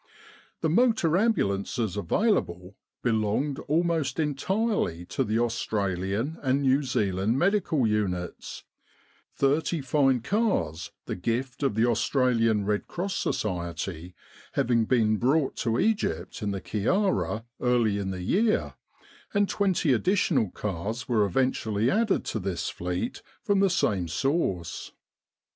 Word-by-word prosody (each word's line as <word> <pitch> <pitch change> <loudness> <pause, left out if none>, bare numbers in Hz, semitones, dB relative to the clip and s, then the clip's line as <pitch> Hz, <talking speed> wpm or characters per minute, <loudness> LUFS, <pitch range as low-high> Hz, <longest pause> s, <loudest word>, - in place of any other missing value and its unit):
The - - +2
motor 220 -6 +3
ambulances 110 - 0
available 100 - 0 0.3
belonged 115 +5 0
al 160 +4 +3
most 165 -3 -1
entirely 155 - -1
to - - -1
the 110 +2 -1
Australian 110 - -1
and 135 0 +1
New 135 +1 +3
Zealand 105 -4 0
medical 175 - +2
units 100 -5 -2 0.7
thirty 150 +4 +1
fine 135 -2 +2
cars, 195 - 0 0.2
the - - -3
gift 120 +8 -3
of 135 -7 +1
the 110 +2 +3
Aus 120 -2 +1
tralian 115 -6 +2
Red 105 0 -1
Cross 190 +3 -3
Society, 90 -2 -3 0.4
having 115 -2 +2
been 110 -3 +2
brought 135 +5 +1
to 115 -2 0
Egypt 95 - -1
in 105 - -1
the 100 -1 -3
Kyarra 115 - 0
early 120 -5 +2
in 100 -1 -3
the 95 -1 -4
year, 210 - +1 0.6
and 205 0 +3
twenty 190 -9 +1
additional 140 - +2
cars 105 +6 -4
were 110 -4 +3
eventually 110 +1 0
added 220 -1 +1
to 110 - -2
this 90 -4 -3
fleet 90 +1 -4 0.2
from 200 -1 +2
the 195 0 +4
same 100 - +1
source. 90 - -2
120 Hz, 125 wpm, -27 LUFS, 100-160 Hz, 0.7 s, the